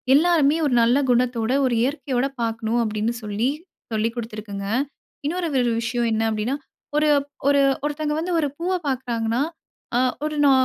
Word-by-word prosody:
எல்லாருமே 315 -1 +4
ஒரு 275 - +1
நல்ல 240 +4 +4
குணத்தோட, 240 -1 +1
ஒரு 250 -2 +1
இயற்கையோட 270 -2 0 0.2
பார்க்கணும் 230 +1 0
அப்படீன்னு 215 +1 -1
சொல்லி 210 +5 0 0.4
சொல்லி 220 +1 +1
குடுத்துருக்குங்க. 215 -4 -5 0.6
இன்னொரு 345 +3 -1
ஒரு 245 -2 +2
விஷயம் 235 +1 0
என்ன 220 +1 +1
அப்படீன்னா, 215 +5 -1 0.4
ஒரு 305 0 +3 0.4
ஒரு 280 0 +5 0.2
ஒருத்தவங்க 300 0 -1
வந்து 350 +2 -2
ஒரு 295 - +1
பூவ 360 +3 -1
பார்க்குறாங்கன்னா 240 -3 -1 0.6
அ - - +4 0.3
ஒரு 305 0 -2
நா 275 - +7
245 Hz, 145 wpm, -23 LUFS, 225-290 Hz, 0.6 s, நா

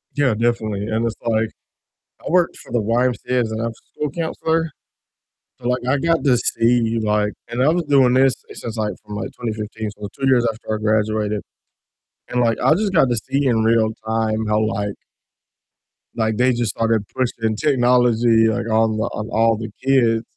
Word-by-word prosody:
Yeah, 140 -5 +2
definitely, 110 -3 -1
and 115 +1 0
it's 115 - -2
like 110 -1 +1 0.8
I - - -3
worked 175 0 +2
for - - -14
the 120 -2 +1
YMCA 120 +3 0
as 110 -1 -2
an 110 - -3
after 115 0 -2 0.2
school 150 -1 -2
counselor, 165 0 -1 0.9
so, 120 - -3
like, 125 0 0
I 140 +1 +2
got 165 +2 +1
to 130 -3 +4
see, 115 -1 +1
like 105 0 +1 0.2
and 120 +2 -1
I 145 - +4
was 170 +2 +2
doing 135 -4 +4
this 130 0 +4 0.2
since, 115 -1 -7
like, 105 -2 -1
from, 105 0 -7
like, - - -4
2015, 110 -2 -4
so 105 0 -8
2 135 - -1
years 120 -2 +4
after 110 0 -5
I - - -2
graduated, 105 -1 0 0.9
and, 125 0 0
like, 115 -2 +1
I 155 - +4
just 200 0 -1
got 135 -7 +4
to 120 - +1
see 135 +5 -1
in 115 -3 +2
real 110 -1 +2
time 110 -1 0
how, 105 0 +2
like 105 -2 -1 1.2
like, 110 -1 0
they 125 +1 +3
just 120 -4 -1
started 115 -2 0
pushing 115 -3 -1
technology, 120 -4 +3
like, 110 +1 -1
on 110 0 +2
the 110 - 0
on 110 +2 -5
all 115 0 +3
the 110 -1 -6
kids, 120 -4 +3
115 Hz, 185 wpm, -20 LUFS, 110-125 Hz, 1.2 s, to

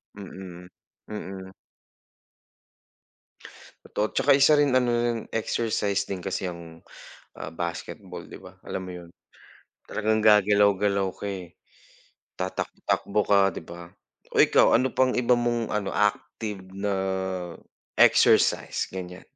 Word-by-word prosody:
Mm, 95 -3 -10 0.4
mm. 95 -2 -7 2.3
Totot 105 +1 -3
tsaka 145 - +3
isa 140 +2 +6
rin 145 -2 +3
ano 125 -1 0
yung 120 -1 0
exercise 110 -3 -1
din 95 -2 -5
kasi 95 -1 -3
yung, 85 -2 -9 0.5
ah, - - -8
basketball 85 +1 -6
di - - -10
ba, - - -13
alam 95 - -5
mo 90 - -7
yun? 85 -1 -10 0.8
Talagang 110 0 0
gagalaw-galaw 100 -1 +4
ka - - -9
eh. 90 -4 -7 0.8
Tatak 95 0 -4
takbo 105 +1 0
ka, 100 -3 +3
'di - - -6
ba? 85 +1 -10 0.5
Oh - - +6
ikaw - - +4
ano 130 +3 +3
pang 130 0 +2
iba 125 0 +3
mong 120 -1 -1
ano 105 -2 -2
active 105 0 -1 0.2
na 100 0 -1 1.0
exercise? - - +4
Ganyan. 90 -1 -7
100 Hz, 120 wpm, -26 LUFS, 95-110 Hz, 2.3 s, isa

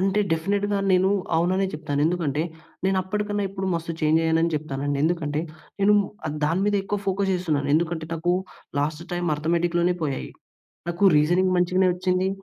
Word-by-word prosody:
అంటే 195 +2 +2
డెఫినిట్‌గా 200 +5 0
నేను 185 +1 +4 0.3
అవుననే 185 +3 +2
చెప్తాను. 145 -2 -2
ఎందుకంటే, 160 -4 0 0.4
నేను 190 0 +2
అప్పటికన్నా 205 +1 -2
ఇప్పుడు 190 0 -4
మస్తు 165 0 -3
ఛేంజ్ 155 +1 +3
అయ్యాను 165 +1 +2
చెప్తానండి. 145 -1 -3
ఎందుకంటే 155 -3 0 0.4
నేను 205 +1 +5 0.3
ఆహ్, 150 - -3
దాని 165 +5 +1
మీద 205 0 +2
ఎక్కువ 205 +1 -2
ఫోకస్ 195 0 +1
చేస్తున్నాను. 155 -6 -1
ఎందుకంటే 160 -1 0
నాకూ 175 +2 +1 0.5
లాస్ట్ 155 +3 -2
టైమ్ 175 -1 -1
అర్ధమెటిక్‌లోనే 170 +2 +1
పోయాయి. 140 -3 -3 0.6
నాకూ 175 +3 +2
రీజనింగ్ 180 +4 +2
మంచిగానే 185 +1 +3
వచ్చింది. 185 +1 0
175 Hz, 150 wpm, -24 LUFS, 155-190 Hz, 0.6 s, నేను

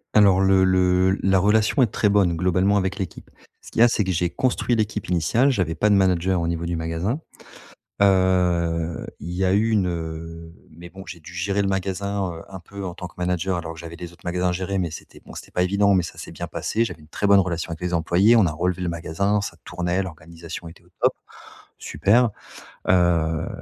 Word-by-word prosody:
Alors 100 -3 +6
le 95 -1 +4
le 95 0 +3
la 95 -1 +4
relation 105 +6 +3
est 120 - +5
très 105 - 0
bonne 100 -4 +3
globalement 95 +4 +2
avec 95 +1 -1
l'équipe. 95 - -6 0.3
Ce - - -14
qu'il - - -4
y - - +9
a - - +8
c'est 110 -3 +1
que 95 - -1
j'ai 85 0 0
construit 120 +5 0
l'équipe 105 -2 -2
initiale, 100 - +2
j'avais 90 - 0
pas 105 - +1
de 100 - +5
manager 95 -1 +2
au 85 - -1
niveau 85 0 -2
du 85 - -2
magasin. 80 - -2 0.8
Heu 90 -4 +2
il 85 - -6
y 95 +2 -1
a 95 - +2
eu 110 +3 +2
une, 100 -5 +2
heu, 80 0 -6 0.2
mais 85 +2 -12
bon 95 +1 -11
j'ai 85 -3 -10
dû 85 - -12
gérer 100 +3 -1
le 100 - 0
magasin, 95 0 -2
heu, 80 - -9
un 95 -1 -8
peu 100 +3 -9
en 90 -1 -5
tant 90 - -7
que - - -20
manager 90 +1 -1
alors 80 -1 -5
que - - -12
j'avais 85 0 -8
les 85 0 -8
autres 85 - -20
magasins 90 +1 0
à - - +1
gérer 95 +2 -2
mais 85 -4 -1
c'était, - - -11
bon, - - -12
c'était - - -10
pas 90 - +1
évident 100 +2 +3
mais 90 -2 +3
ça - - -8
s'est - - -8
bien - - -6
passé, 115 - -1
j'avais 110 - -5
une 75 - -17
très 100 +5 -2
bonne 100 -1 +7
relation 85 -3 -2
avec 80 - -6
les 90 0 -3
employés, 90 +7 +4
on 110 -5 +5
a 80 - 0
relevé 90 +3 -2
le 90 - -1
magasin, 85 +5 -1
ça 100 -4 -5
tournait, 90 +1 -2
l'organisation 85 0 -9
était 80 - -14
au - - -25
top. - - +4 0.7
Super. 105 +10 +2 0.6
Heu 85 -3 +2
90 Hz, 230 wpm, -23 LUFS, 85-100 Hz, 0.8 s, y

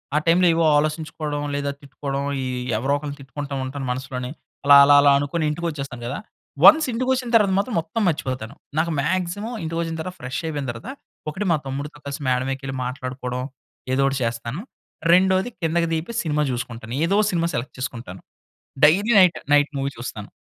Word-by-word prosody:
ఆ - - +4
టైమ్‌లో 175 +2 +5
ఏవో 165 0 +2
ఆలోచించుకోవడం, 150 -1 -2
లేదా 140 0 -1
తిట్టుకోవడం 140 0 -4 0.2
ఈ - - -3 0.3
ఎవరో 135 +5 0
ఒకరిని 145 -1 -6
తిట్టుకుంటూ 140 +1 -7
ఉంటాను 135 +1 -5
మనసులోనే. 130 0 -4 0.3
అలా, 140 0 +9
అలా, 145 - +7
అలా 140 0 +6
అనుకోని 150 +3 -1
ఇంటికొచ్చేస్తాను 150 -6 -4
కదా! 130 - -3 0.5
వన్స్ 315 0 +9
ఇంటికొచ్చిన 255 +1 0
తర్వాత 210 -3 +5
మాత్రం 210 +3 -1
మొత్తం 165 +8 -3
మర్చిపోతాను. 130 -6 -2 0.2
నాకు 165 +1 +1
మ్యాక్సిమమ్ 185 - -2
ఇంటికొచ్చిన 165 0 -2
తర్వాత 185 +2 -6
ఫ్రెష్ 130 +4 -4
అయిపోయిన 145 -3 -3
తర్వాత, 115 0 -9 0.4
ఒకటి 190 +7 -4
మా 165 - +4
తమ్ముడితో 140 +3 -5
కలిసి 140 +1 -5
మేడమేకేళ్ళి 135 +1 -1
మాట్లాడుకోవడం, 125 -1 -4 0.5
ఏదో 135 - +2
ఒకటి 135 0 -1
చేస్తాను. 115 +7 -3 0.5
రెండోది 190 +4 +4
కిందకి 165 +1 +1
దిగిపోయి, 165 +9 -3
సినిమా 150 -2 0
జూసుకుంటాను. 120 -1 -5
ఏదో 190 +4 +1
ఒక 210 - +1
సినిమా 170 -1 0
సెలెక్ట్ 120 +3 -4
చేసుకుంటాను. 115 -7 -6 0.6
డైలీ 200 +9 +4
నైట్ 180 -3 +5 0.2
నైట్ 145 0 +5
మూవీ 135 0 -1
చూస్తాను. 110 -3 -7
145 Hz, 160 wpm, -23 LUFS, 130-170 Hz, 0.6 s, అలా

